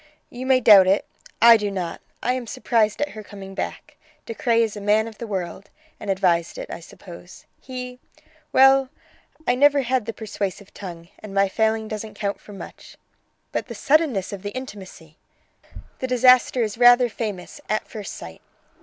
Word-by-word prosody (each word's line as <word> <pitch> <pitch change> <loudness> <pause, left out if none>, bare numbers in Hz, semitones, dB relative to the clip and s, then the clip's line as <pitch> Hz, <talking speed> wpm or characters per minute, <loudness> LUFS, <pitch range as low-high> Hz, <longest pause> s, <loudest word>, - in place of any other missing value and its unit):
"You 255 +2 -6
may 260 -1 +5
doubt 200 -5 +8
it; 195 +2 +2 0.4
I 235 -1 +9
do 210 -1 -2
not. 185 -4 -4 0.2
I 250 - +1
am 255 -2 -4
surprised 215 0 0
at 295 - -3
her 215 - -9
coming 195 -2 -10
back. 295 +8 -6 0.3
De 230 - -5
Craye 230 +1 +2
is 220 -2 -3
a 205 - -7
man 210 +2 +2
of 220 -2 -11
the 235 - -6
world, 190 -1 -5 0.3
and 205 - -7
advised 180 -3 +1
it, - - -7
I - - -6
suppose. 175 +1 -13 0.2
He 250 -1 -7 0.5
well, 270 0 +5 0.6
I 245 - +3
never 285 +2 +4
had 250 -2 -1
the - - -1
persuasive 200 -2 -5
tongue, 170 -3 -9
and 205 -2 -10
my 195 0 +4
failing 220 +2 0
doesn't 215 0 -6
count 200 -1 -3
for - - -14
much." 195 - -11 0.5
"But - - -3
the - - -8
suddenness 275 - +1
of 195 - -7
the 205 +3 -6
intimacy!" 190 -10 -9 0.8
"The 260 - -2
disaster 255 0 +4
is 215 +1 -4
rather 245 0 +7
famous 215 +1 -6
'at 215 - -1
first 210 -4 -7
sight'. 80 -1 -10
215 Hz, 180 wpm, -23 LUFS, 195-250 Hz, 0.8 s, I